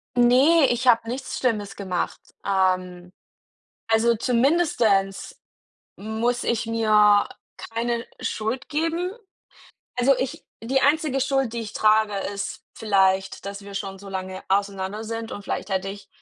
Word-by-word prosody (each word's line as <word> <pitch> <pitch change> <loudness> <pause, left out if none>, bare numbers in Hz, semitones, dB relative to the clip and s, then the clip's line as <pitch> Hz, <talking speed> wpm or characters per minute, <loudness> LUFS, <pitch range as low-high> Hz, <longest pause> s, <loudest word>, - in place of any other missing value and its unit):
Ne, 260 +6 +5
ich 245 +1 -1
habe 230 -1 +5
nichts 260 +2 -4
Schlimmes 210 -5 -1
gemacht. 185 -3 -3 0.3
Ähm, 185 -2 0 0.8
also 225 +1 +3
zumindest 235 - +1 0.6
muss 225 +4 -2
ich 235 0 0
mir 210 -2 +4 0.3
keine 235 +1 -3
Schuld 225 +5 -3
geben. 330 +4 -1 0.9
Also, 270 +3 +5
ich 270 +5 -4 0.2
die 265 +3 +1
einzige 290 -1 +2
Schuld, 270 -2 0
die 235 - -3
ich 215 -3 -7
trage, 215 -1 +3 0.2
ist 200 - -5
vielleicht, 195 -2 +1
dass 200 0 -6
wir 200 0 -10
schon 195 -1 -5
so 200 - -11
lange 190 -1 -5
auseinander 200 +1 -1
sind 225 0 -5
und 205 - -7
vielleicht 195 - -4
hätte 190 0 -1
ich 200 +1 -9
220 Hz, 135 wpm, -24 LUFS, 195-245 Hz, 0.9 s, Ne